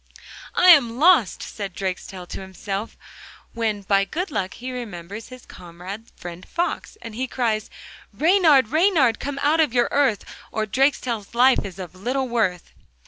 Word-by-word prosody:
'I 365 Hz, -, +5 dB
am 245 Hz, -9 st, +6 dB
lost!' 310 Hz, -, +4 dB
said 200 Hz, -4 st, -6 dB
Drakestail 185 Hz, -1 st, -5 dB
to -, -, -6 dB
himself, 195 Hz, +3 st, -6 dB, 0.6 s
when 220 Hz, -3 st, -2 dB
by 195 Hz, 0 st, +3 dB
good 340 Hz, -, -4 dB
luck 190 Hz, -8 st, -3 dB
he 255 Hz, +2 st, -6 dB
remembers 210 Hz, -4 st, -7 dB
his 255 Hz, -1 st, -13 dB
comrade 180 Hz, +5 st, -10 dB
friend 175 Hz, +1 st, -9 dB
Fox, 345 Hz, +4 st, -3 dB
and 230 Hz, -, -8 dB
he 255 Hz, +4 st, -3 dB
cries: 225 Hz, -4 st, -1 dB, 0.4 s
'Reynard, 315 Hz, -, +4 dB
Reynard, 315 Hz, -, +3 dB
come 280 Hz, 0 st, -4 dB
out 305 Hz, +3 st, +3 dB
of 300 Hz, -6 st, +2 dB
your 240 Hz, -1 st, +3 dB
earth, 270 Hz, -7 st, +1 dB, 0.3 s
Or 220 Hz, -, -1 dB
Drakestail's 235 Hz, -2 st, 0 dB
life 255 Hz, +2 st, +5 dB
is 195 Hz, -2 st, -8 dB
of 180 Hz, -3 st, -8 dB
little 255 Hz, +8 st, -2 dB
worth. 210 Hz, -7 st, -1 dB
230 Hz, 155 wpm, -23 LUFS, 195-270 Hz, 0.6 s, am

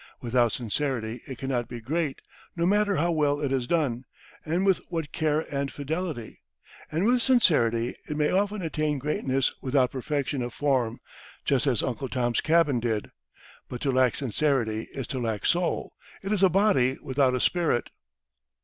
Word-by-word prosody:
Without 120 Hz, -1 st, +2 dB
sincerity 120 Hz, -1 st, -2 dB
it 130 Hz, -, -6 dB
cannot 130 Hz, -2 st, -2 dB
be 120 Hz, -, -7 dB
great, 145 Hz, +4 st, -2 dB, 0.3 s
no 170 Hz, -1 st, 0 dB
matter 205 Hz, +1 st, +3 dB
how 170 Hz, +2 st, +1 dB
well 145 Hz, -3 st, +1 dB
it 140 Hz, -3 st, -1 dB
is 130 Hz, -3 st, 0 dB
done, 135 Hz, -7 st, 0 dB, 0.4 s
with 185 Hz, +4 st, +3 dB
what 165 Hz, -4 st, -3 dB
care 155 Hz, -1 st, +1 dB
and 140 Hz, 0 st, -1 dB
fidelity; 150 Hz, -4 st, -4 dB, 0.5 s
and 165 Hz, +5 st, 0 dB
with 245 Hz, +2 st, +3 dB
sincerity 125 Hz, -, +3 dB, 0.2 s
it 150 Hz, -, -2 dB
may 150 Hz, -1 st, +2 dB
often 200 Hz, +1 st, 0 dB
attain 155 Hz, -2 st, -1 dB
greatness 135 Hz, -1 st, 0 dB
without 130 Hz, -1 st, +2 dB
perfection 140 Hz, 0 st, -2 dB
of 120 Hz, -1 st, -5 dB
form, 130 Hz, -5 st, 0 dB, 0.5 s
just 140 Hz, 0 st, +2 dB
as 125 Hz, -6 st, +2 dB
"Uncle 130 Hz, +1 st, -3 dB
Tom's 120 Hz, -2 st, 0 dB
Cabin" 155 Hz, -5 st, +3 dB
did. 110 Hz, -3 st, -2 dB, 0.6 s
But 125 Hz, -, -5 dB
to 140 Hz, -, +1 dB
lack 130 Hz, -1 st, +3 dB
sincerity 125 Hz, -4 st, 0 dB
is 135 Hz, -, -5 dB
to 130 Hz, -, -4 dB
lack 110 Hz, -4 st, -2 dB
soul; 175 Hz, 0 st, 0 dB, 0.3 s
it 195 Hz, -, -3 dB
is 210 Hz, -3 st, +1 dB
a 190 Hz, -, +6 dB
body 180 Hz, -9 st, +3 dB
without 130 Hz, -1 st, +2 dB
a -, -, 0 dB
spirit. 165 Hz, -5 st, +1 dB
140 Hz, 165 wpm, -27 LUFS, 125-165 Hz, 0.6 s, a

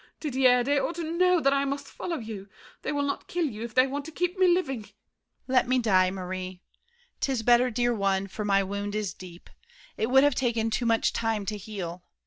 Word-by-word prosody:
Didier, 255 Hz, -4 st, +3 dB
they 285 Hz, +3 st, +2 dB
ought 335 Hz, -, -2 dB
to 340 Hz, -, -4 dB
know 355 Hz, +2 st, +3 dB
that 275 Hz, -1 st, +3 dB
I 275 Hz, 0 st, +2 dB
must 280 Hz, 0 st, -3 dB
follow 340 Hz, -2 st, -4 dB
You! 215 Hz, -5 st, -7 dB, 0.3 s
They -, -, -3 dB
will 285 Hz, -1 st, 0 dB
not 280 Hz, 0 st, -3 dB
kill 350 Hz, -1 st, -1 dB
you 220 Hz, -7 st, -5 dB
if 230 Hz, -1 st, -6 dB
they 255 Hz, 0 st, +6 dB
want 280 Hz, +2 st, -4 dB
To 320 Hz, -, -8 dB
keep 355 Hz, +3 st, -1 dB
me 375 Hz, -1 st, +4 dB
living! 345 Hz, -9 st, +1 dB
DIDIER. 210 Hz, -, -16 dB, 0.5 s
Let 255 Hz, -1 st, +3 dB
me 255 Hz, +1 st, +2 dB
die, 190 Hz, -6 st, +3 dB
Marie. 185 Hz, 0 st, -6 dB, 0.6 s
'Tis 260 Hz, -5 st, -1 dB
better, 245 Hz, +2 st, +5 dB
dear 240 Hz, +1 st, +1 dB
one, 195 Hz, -2 st, 0 dB
for 200 Hz, +2 st, -6 dB
my 195 Hz, -1 st, +3 dB
wound 200 Hz, +1 st, -4 dB
is 210 Hz, -3 st, -2 dB
deep; 180 Hz, -2 st, -12 dB, 0.5 s
It 220 Hz, -, 0 dB
would 265 Hz, +1 st, +6 dB
have 290 Hz, -1 st, +4 dB
taken 235 Hz, -3 st, 0 dB
too 235 Hz, +2 st, 0 dB
much 225 Hz, -1 st, +2 dB
time 225 Hz, -3 st, -1 dB
to 210 Hz, -, -2 dB
heal. 185 Hz, -4 st, -6 dB
240 Hz, 220 wpm, -27 LUFS, 200-280 Hz, 0.6 s, they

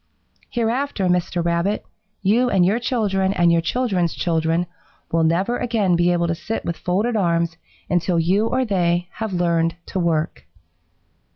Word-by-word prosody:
"'Hereafter, 240 Hz, -2 st, -1 dB
Mr. 180 Hz, -1 st, 0 dB
Rabbit, 170 Hz, +5 st, 0 dB, 0.4 s
you 235 Hz, +6 st, +3 dB
and 185 Hz, -5 st, +3 dB
your 205 Hz, +6 st, +2 dB
children 200 Hz, -6 st, 0 dB
and 175 Hz, -2 st, +3 dB
your 170 Hz, 0 st, +3 dB
children's 185 Hz, -4 st, 0 dB
children 165 Hz, 0 st, 0 dB, 0.5 s
will 165 Hz, 0 st, +2 dB
never 185 Hz, +9 st, +1 dB
again 215 Hz, -7 st, +1 dB
be 175 Hz, +1 st, +3 dB
able 170 Hz, -1 st, +1 dB
to 165 Hz, -, 0 dB
sit 220 Hz, +7 st, -4 dB
with 170 Hz, -, -2 dB
folded 205 Hz, +9 st, -1 dB
arms 170 Hz, -4 st, +1 dB, 0.3 s
until 175 Hz, 0 st, +1 dB
you 190 Hz, +7 st, +2 dB
or 255 Hz, +2 st, 0 dB
they 175 Hz, -4 st, 0 dB
have 220 Hz, -2 st, -3 dB
learned 170 Hz, -2 st, +1 dB
to 190 Hz, -, -3 dB
work.' 165 Hz, -2 st, -1 dB
180 Hz, 155 wpm, -21 LUFS, 170-215 Hz, 0.5 s, you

